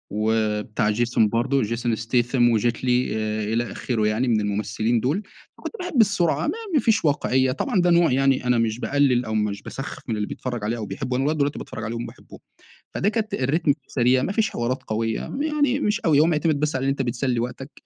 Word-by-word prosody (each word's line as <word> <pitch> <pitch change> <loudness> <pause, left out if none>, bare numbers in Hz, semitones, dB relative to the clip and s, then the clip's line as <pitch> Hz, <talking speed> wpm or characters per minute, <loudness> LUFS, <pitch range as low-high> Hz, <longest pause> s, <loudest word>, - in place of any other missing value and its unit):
و 110 -1 +1
بتاع 105 -1 -1
جيسون 115 0 +2
برضو 130 +5 +1
جيسون 115 +1 -1
ستاثام، 120 +2 +2
وجيت 115 +2 0
لي 125 -2 +1
إ 110 0 -2
إلى 120 +1 -1
آخره 110 -4 -1
يعني 110 +4 0
من 110 -3 +2
الممثّلين 105 +3 0
دول، 150 - -1 0.3
فكنت - - -7
باحب 355 -9 +1
السرعة 170 -7 +1
ما - - 0 0.2
ما 300 - +5
فيش 220 -8 +2
واقعيّة، 130 -3 +2
طبعًا 175 +7 0
ده 175 - +3
نوع 170 -4 +4
يعني 135 -1 +2
أنا 125 -1 +3
مش 115 0 0
باقلل 130 -3 +2
أو 110 - -4
مش 105 -2 -1
باسخف 135 - -7
من 110 - 0
اللي 105 - -2
بيتفرج 120 -4 -5
عليه 115 +3 -1
أو 110 - -4
بيحبه، 125 +4 -3
أنا 135 - 0
لغاية 155 +2 0
دلوقتي 145 0 0
باتفرج 110 - -7
عليهم 115 +2 -4
باحبهم. - - -13 0.5
فده 200 - +1
كانت 220 -1 -2
الريتم 145 +3 +1
فيه 150 - -20
سريع 125 0 +2
ما 195 - -1
فيش 215 0 +1
حوارات 120 +2 -2
قويّة 110 +1 -2
ما 285 +3 -3
يعني 290 -3 +1
مش 210 -4 0
أوي 155 -4 +3
هو 155 - +6
معتمد 155 -2 +1
بس 150 -2 0
على 135 +1 0
أنت 135 0 -1
بتسلي 125 0 -1
وقتك، 130 +4 -5
125 Hz, 215 wpm, -23 LUFS, 115-150 Hz, 0.5 s, هو